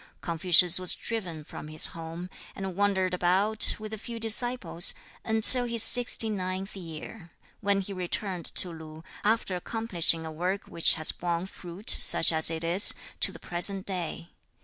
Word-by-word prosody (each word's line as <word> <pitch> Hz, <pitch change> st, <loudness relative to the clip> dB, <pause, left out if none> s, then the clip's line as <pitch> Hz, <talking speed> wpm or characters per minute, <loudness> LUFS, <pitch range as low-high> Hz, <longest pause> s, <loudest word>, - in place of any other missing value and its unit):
Confucius 175 Hz, +1 st, +3 dB
was 185 Hz, -1 st, +1 dB
driven 180 Hz, -9 st, -8 dB
from 150 Hz, -, -12 dB
his 155 Hz, 0 st, +2 dB
home, 165 Hz, +2 st, -10 dB, 0.3 s
and 190 Hz, -2 st, -8 dB
wandered 190 Hz, -2 st, -2 dB
about, 190 Hz, +5 st, +2 dB
with 215 Hz, 0 st, -11 dB
a 220 Hz, -, -8 dB
few 230 Hz, +1 st, -10 dB
disciples, 225 Hz, -6 st, -2 dB, 0.3 s
until 225 Hz, +3 st, +7 dB
his 235 Hz, -2 st, +3 dB
sixty 245 Hz, -2 st, +4 dB
ninth 190 Hz, -1 st, -6 dB
year, 170 Hz, +1 st, -12 dB, 0.3 s
when 200 Hz, -1 st, -2 dB
he 195 Hz, +1 st, -9 dB
returned 185 Hz, -1 st, -6 dB
to 180 Hz, -, 0 dB
Lu, 160 Hz, -1 st, -13 dB, 0.2 s
after 215 Hz, -3 st, -2 dB
accomplishing 175 Hz, -5 st, -1 dB
a 160 Hz, -, -9 dB
work 180 Hz, +5 st, -5 dB
which 165 Hz, -, 0 dB
has 160 Hz, -1 st, +2 dB
borne 170 Hz, 0 st, -5 dB
fruit, 190 Hz, +2 st, -14 dB
such -, -, +3 dB
as 160 Hz, 0 st, +3 dB
it 165 Hz, 0 st, -4 dB
is, 175 Hz, +5 st, +5 dB, 0.2 s
to -, -, -1 dB
the -, -, -14 dB
present 190 Hz, +2 st, +2 dB
day. 175 Hz, -3 st, -6 dB
185 Hz, 160 wpm, -25 LUFS, 170-210 Hz, 0.3 s, until